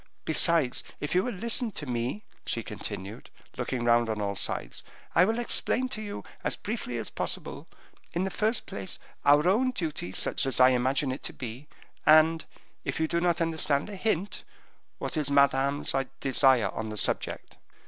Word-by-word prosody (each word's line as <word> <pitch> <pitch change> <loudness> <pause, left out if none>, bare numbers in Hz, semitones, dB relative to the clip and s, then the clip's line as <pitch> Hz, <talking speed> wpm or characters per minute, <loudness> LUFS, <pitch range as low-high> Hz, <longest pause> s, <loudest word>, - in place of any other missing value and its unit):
Besides, 160 -4 +3 0.2
if 145 - -3
you 180 +1 +3
will 250 - -2
listen 230 +3 0
to 150 - -5
me," 125 - -2 0.2
she - - -2
continued, 100 +4 -6 0.3
looking 125 -2 -2
round 120 -1 +4
on 110 -1 -2
all 100 -1 -1
sides, - - -3 0.3
"I 180 - +6
will 225 +3 0
explain 245 +1 +1
to 215 - -3
you, 205 -1 -6 0.2
as - - 0
briefly 205 - -4
as 115 - -5
possible, - - -4 0.5
in 175 - 0
the 190 - -2
first 220 +4 0
place, 95 -1 -3 0.3
our 145 +3 +6
own 235 +8 +3
duty, 160 - -3
such 135 - +2
as 130 - +1
I 130 0 +8
imagine 130 +2 +1
it 130 - -5
to - - -3
be, 125 +4 -7 0.4
and, 155 +1 +6 0.4
if - - -3
you 160 - +2
do 170 +2 0
not 175 -1 +2
understand 160 0 0
a - - -6
hint, 195 -1 -1 0.5
what - - -4
is 150 -2 0
Madame's 140 0 +3 0.3
desire 130 -5 +3
on 110 +2 -4
the 105 - -6
subject." - - -2
150 Hz, 175 wpm, -28 LUFS, 125-185 Hz, 0.5 s, I